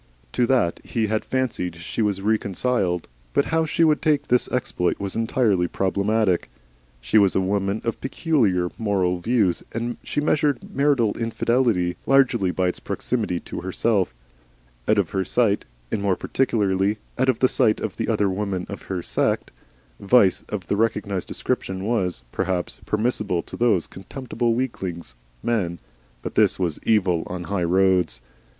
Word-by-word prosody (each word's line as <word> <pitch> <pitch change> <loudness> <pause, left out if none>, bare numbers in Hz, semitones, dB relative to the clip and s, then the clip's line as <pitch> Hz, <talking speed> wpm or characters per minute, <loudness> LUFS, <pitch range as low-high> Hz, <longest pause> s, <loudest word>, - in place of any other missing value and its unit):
To 120 -1 +1
that 120 -10 +2
he 115 -2 -1
had 110 0 -1
fancied 120 -10 -2
she 85 +6 -4
was 100 -3 0
reconciled, 100 -3 0 0.3
but - - +4
how 160 0 +1
she 165 - +2
would 155 -2 +3
take 155 -3 +1
this 125 0 +3
exploit 105 -8 -1
was 100 -1 -4
entirely 110 -5 +2
problematical. 100 +1 +1 0.5
She - - +3
was 100 -2 +3
a - - +4
woman 100 +2 0
of 115 - -3
peculiar 115 - +1
moral 95 -5 +1
views, 105 -2 +1
and 120 +1 -3
she - - -2
measured 145 -3 0
marital 140 -6 +2
infidelity 115 -5 +1
largely 135 -8 +4
by 90 +1 0
its - - -5
proximity 110 -8 -2
to - - -6
herself. 95 +1 +1 0.8
Out 110 - +4
of 100 -5 +1
her 95 -2 0
sight, 105 -1 +1 0.3
and 100 - -1
more 100 -2 +2
particularly 100 -5 +1 0.2
out 130 +1 +3
of 125 - +3
the 130 - +4
sight 110 -3 +2
of 110 -1 -4
the 115 - -2
other 105 -3 +2
women 95 -1 -2
of 100 - -6
her 90 -3 -2
set, - - 0 0.5
vice 100 -2 +4
of 95 -4 -4
the 100 - 0
recognised 105 -3 -1
description 95 0 -3
was, 90 - -1
perhaps, 95 -2 -2
permissible 105 -5 0
to - - -9
those 110 -8 +2
contemptible 120 +3 -3
weaklings, 90 - -4 0.3
men, 95 -8 0 0.5
but - - -4
this - - +3
was 85 -5 -1
Evil 95 -6 +3
on 90 0 -5
the - - -10
High 100 -3 0
Roads. 90 -7 +3
100 Hz, 160 wpm, -23 LUFS, 95-120 Hz, 0.8 s, but